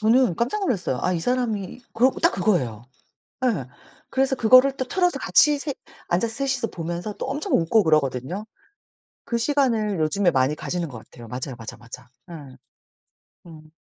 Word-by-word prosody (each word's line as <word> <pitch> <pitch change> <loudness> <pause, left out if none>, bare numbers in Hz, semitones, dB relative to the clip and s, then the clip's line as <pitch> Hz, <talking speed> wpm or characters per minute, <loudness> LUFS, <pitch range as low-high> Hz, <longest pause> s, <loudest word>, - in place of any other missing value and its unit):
저는 225 -3 +3
깜짝 245 - -1
놀랐어요. 195 - -1
아 185 - +1
이 170 - -1
사람이 235 -3 -2
그래 240 +3 +4
갖고 - - -6
딱 - - +4
그거예요. 130 - 0 0.6
예. 175 - 0 0.4
그래서 265 0 +1
그거를 255 +3 +5
또 260 - -2
틀어서 355 +5 +1
같이 295 -1 +4
셋 285 -2 -4 0.3
앉아서 220 +6 0
셋이서 265 -2 -1
보면서 175 +3 -5
또 - - -6
엄청 290 +9 -3
웃고 190 +6 +3
그러거든요. 155 - 0 0.8
그 235 - -1
시간을 230 - +1
요즘에 175 +4 +2
많이 130 +2 +1
가지는 170 +1 -4
것 125 - -9
같아요. 120 +1 -14
맞아요, 125 +3 -5
맞아, 115 -2 -8
맞아. 125 +1 -12 0.2
예. 140 -5 -10 0.9
음. 155 -2 -14
200 Hz, 345 characters per minute, -23 LUFS, 155-255 Hz, 0.9 s, 그거를